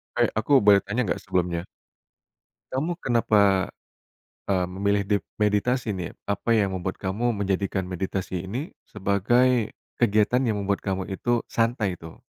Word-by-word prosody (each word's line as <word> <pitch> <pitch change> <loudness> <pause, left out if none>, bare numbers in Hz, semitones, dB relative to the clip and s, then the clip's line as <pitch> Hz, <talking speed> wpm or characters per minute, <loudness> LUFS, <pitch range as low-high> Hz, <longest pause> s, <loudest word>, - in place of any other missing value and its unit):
Eh, 120 -1 +3
aku 135 +2 +4
boleh 100 -1 +7
tanya 110 +5 -1
nggak - - 0
sebelumnya? 90 -1 -1 1.1
Kamu 160 +7 -2
kenapa, 100 - +3 0.8
eee, 95 -2 +2
memilih 100 +3 0
dep 100 0 0
meditasi 105 +3 +1
nih? 90 -3 -4 0.2
Apa 105 +3 +1
yang 100 -3 +1
membuat 95 0 -3
kamu 110 +4 -1
menjadikan 95 -1 -1
meditasi 95 0 -3
ini, 130 - -4
sebagai 110 +4 +2 0.3
kegiatan 110 +2 +3
yang 115 -5 0
membuat 100 0 0
kamu 95 -1 -2
itu 120 +4 0
santai 115 -4 0
itu? 80 -1 -10
100 Hz, 135 wpm, -25 LUFS, 95-120 Hz, 1.1 s, boleh